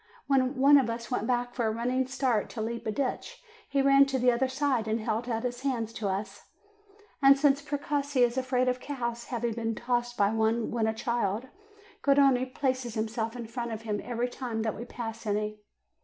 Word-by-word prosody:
When 265 -1 +2
one 280 +2 +7
of 250 -4 0
us 230 +1 -5
went 230 -3 -1
back 245 -1 0
for 235 -3 0
a - - +1
running 250 +3 0
start 260 -5 0
to 225 - -5
leap 235 0 -4
a - - +1
ditch, 280 - -3 0.3
he 275 -1 +2
ran 275 0 +6
to 270 -1 0
the 250 0 +4
other 250 +2 +1
side, 260 -4 0
and 220 +1 0
held 225 +2 -2
out 225 0 -1
his 245 0 -3
hands 235 -5 -2
to 215 - -3
us; 195 +2 -5 0.7
and 275 0 +7
since 280 0 +3
Precossi 285 -2 0
is 240 0 +2
afraid 255 -1 +1
of 250 0 +1
cows, 235 -4 -4
having 235 -2 -2
been 225 0 -2
tossed 240 +1 -1
by 200 0 +3
one 225 +1 +1
when 230 -2 0
a 220 - +1
child, 235 0 -1 0.5
Garrone 275 -2 +4
placed 255 -4 -1
himself 225 +1 -2
in 240 -2 -5
front 235 +1 -4
of 220 0 -6
him 210 -2 -2
every 240 0 -1
time 240 -3 -4
that 220 -2 -1
we 235 - -7
passed 225 -2 -6
any. 210 0 -2
240 Hz, 205 wpm, -29 LUFS, 225-260 Hz, 0.7 s, one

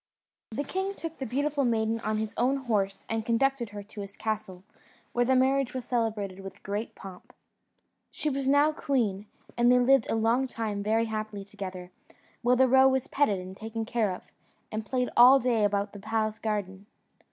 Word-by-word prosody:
The 235 +6 -3
king 380 +6 -3
took 330 -3 -7
the 265 - -3
beautiful 285 +4 0
maiden 225 -2 +1
on 215 -1 -1
his 215 -1 -3
own 255 +4 +2
horse 210 -7 -1
and 225 -1 -2
conducted 240 +1 +1
her 205 0 -8
to 205 0 -9
his 200 0 -9
castle, 215 -4 -4 0.5
where 245 0 +2
the 260 +1 +3
marriage 265 0 +2
was 255 - -4
celebrated 215 -5 -2
with 195 -1 -10
great 205 +3 -4
pomp. 190 -2 -11 0.8
She 305 - -4
was 275 -2 -1
now 285 +2 +5
queen, 220 -9 -1 0.3
and 240 +1 +4
they 250 - +6
lived 250 -1 +4
a - - +1
long 230 +4 +2
time 220 -4 -3
very 220 +2 +1
happily 215 -2 -4
together; 185 -2 -8 0.5
while 245 +1 +3
the 260 +1 +5
roe 265 +1 +6
was 265 -1 +1
petted 275 -9 +1
and 185 +1 -8
taken 225 +2 -5
care 220 -3 0
of, 180 - -7 0.5
and 215 0 -3
played 250 -1 -1
all 250 +3 +9
day 235 -4 +1
about 200 0 0
the 205 - -9
palace 215 +1 -1
garden. 205 -2 -3
225 Hz, 185 wpm, -28 LUFS, 205-260 Hz, 0.8 s, all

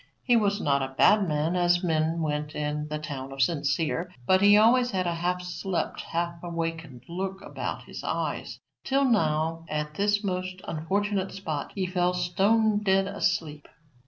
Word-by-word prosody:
He 245 - +4
was 205 -2 +2
not 140 -5 +1
a 135 0 -4
bad 205 -2 +5
man, 155 +3 0
as 175 0 +3
men 165 0 +1
went 150 0 -2
in 150 0 -2
the 150 0 -3
town 140 -3 -6
of 135 0 +1
Sincere, 160 +4 0
but 185 +7 +4
he 205 +1 +7
always 245 +3 +5
had 185 -5 -1
a 175 - 0
half 180 +2 -1
slept 180 +1 -3
half 170 0 -3
awakened 165 -6 -4
look 190 +2 -4
about - - -5
his - - -9
eyes, - - -3 0.3
till 275 +1 +2
now, 165 -7 +1
at 150 0 -3
this 205 +4 +1
most 185 -1 -3
unfortunate 195 +4 -1
spot, 155 -7 -4
he 190 -2 -1
fell 180 0 0
stone 205 +5 +2
dead 195 -1 +3
asleep. 170 -7 -2
175 Hz, 165 wpm, -27 LUFS, 155-195 Hz, 0.3 s, he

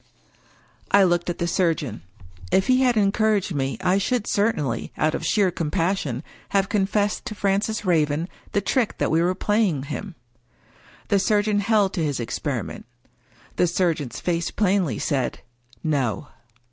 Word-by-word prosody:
I 200 0 +6
looked 175 -1 +1
at 175 - -2
the 170 - -1
surgeon. 165 - 0 0.5
If 190 - +3
he 255 0 +3
had 250 -3 +3
encouraged 205 -2 +2
me, 135 -2 -1
I 185 +2 +2
should 230 +2 0
certainly, 150 - 0
out 155 +1 +1
of - - -3
sheer 200 -4 +2
compassion, 165 -5 -1 0.3
have 195 -1 +1
confessed 205 0 0
to 215 - -5
Francis 205 +2 0
Raven 160 -2 +1 0.3
the 205 - +2
trick 245 -2 0
that - - 0
we 160 +1 +3
were 180 +2 +1
playing 205 -9 +1
him. 185 +6 -6 0.9
The 200 - +3
surgeon 205 +1 +2
held 205 -2 +2
to 170 - -1
his 145 -4 -1
experiment; 115 - -4 0.7
the 180 - +3
surgeon's 165 -7 -1
face 170 -1 -1
plainly 185 - +1
said—" 130 -4 -1 0.4
No." 135 - -1
185 Hz, 145 wpm, -23 LUFS, 155-205 Hz, 0.9 s, I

